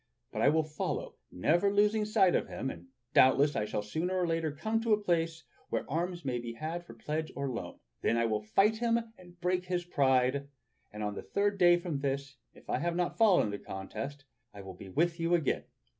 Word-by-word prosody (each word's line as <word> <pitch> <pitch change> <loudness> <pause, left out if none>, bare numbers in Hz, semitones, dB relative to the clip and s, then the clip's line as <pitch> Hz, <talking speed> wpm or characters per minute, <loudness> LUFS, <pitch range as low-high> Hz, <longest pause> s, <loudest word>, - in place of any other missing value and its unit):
But - - -3
I - - +6
will 160 +1 +3
follow, 155 0 -3 0.2
never 175 - +2
losing 210 +1 +3
sight 190 -4 +4
of - - +1
him, 135 - -4
and - - -12 0.3
doubtless 140 +3 +5
I 105 - 0
shall 105 - -3
sooner 170 - -2
or 180 - +2
later 165 -2 0
come 220 +10 -1
to 225 -1 +2
a 210 - +3
place 165 -4 0 0.3
where - - -1
arms 175 +1 -2
may 125 -2 -1
be 120 0 -6
had 160 +7 -4
for - - -13
pledge 155 +1 -3
or 140 -1 -2
loan. 115 - -6 0.2
Then 115 - +2
I 115 - +2
will 110 -2 0
fight 195 - +3
him 230 0 +2 0.2
and 175 -1 -16
break 180 +1 0
his 180 -1 -2
pride, 135 -3 +2 0.4
and 105 0 -6
on 105 0 -2
the - - -6
third 200 0 0
day 175 -1 +7
from 170 -5 -3
this, 140 0 -3 0.2
if - - -18
I - - 0
have 170 0 -1
not 175 +4 -1
fallen 215 -5 +6
in 105 - -2
the 100 - -4
contest, 135 +9 -6 0.3
I 100 - -8
will 95 -1 -8
be 95 +2 -11
with 170 - +1
you 165 +1 +2
again. 160 -5 0
160 Hz, 220 wpm, -31 LUFS, 135-180 Hz, 0.4 s, day